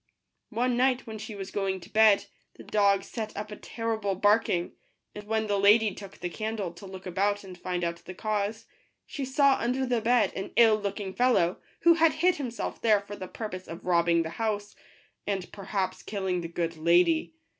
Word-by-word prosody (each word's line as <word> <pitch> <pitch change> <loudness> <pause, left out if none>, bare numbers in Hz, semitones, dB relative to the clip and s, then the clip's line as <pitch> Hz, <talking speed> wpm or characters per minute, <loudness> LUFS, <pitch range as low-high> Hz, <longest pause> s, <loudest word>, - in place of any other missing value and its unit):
One 245 +2 0
night, 255 0 +2
when 220 -2 -7
she 215 0 -7
was 195 -1 -7
going 195 -2 -1
to - - -15
bed, 215 -2 +5 0.3
the - - -12
dog 200 -2 +2
set 220 -2 -6
up 210 +1 -5
a - - -5
terrible 220 -3 -3
barking; 205 -3 +2 0.4
and 210 0 -9
when 220 +1 0
the 205 -1 0
lady 210 +1 +5
took 195 0 -11
the 175 - -4
candle 215 -3 -3
to 175 +3 -11
look 190 0 -10
about 200 +3 0
and 185 -2 -10
find 180 0 -3
out 170 0 -1
the 185 +2 -11
cause, 215 +2 -2 0.4
she 280 - -5
saw 270 +1 +3
under 255 +3 0
the 245 -2 0
bed 230 -3 +3
an 195 +1 -5
ill 225 -2 +6
looking 200 -1 -4
fellow, 235 -8 +2 0.2
who 340 - +7
had 330 -1 +4
hid 345 +4 +2
himself 245 -5 -4
there 215 -3 +4
for 205 0 -8
the 185 -2 -7
purpose 185 -4 -6
of 165 - -9
robbing 170 -1 +3
the 160 - -5
house, 205 -2 -2 0.5
and 195 -3 -2
per 200 -2 -10
haps 190 -2 -2
killing 190 -3 -2
the 170 - -4
good 165 0 -3
lady. 180 - +3
205 Hz, 200 wpm, -28 LUFS, 185-225 Hz, 0.5 s, who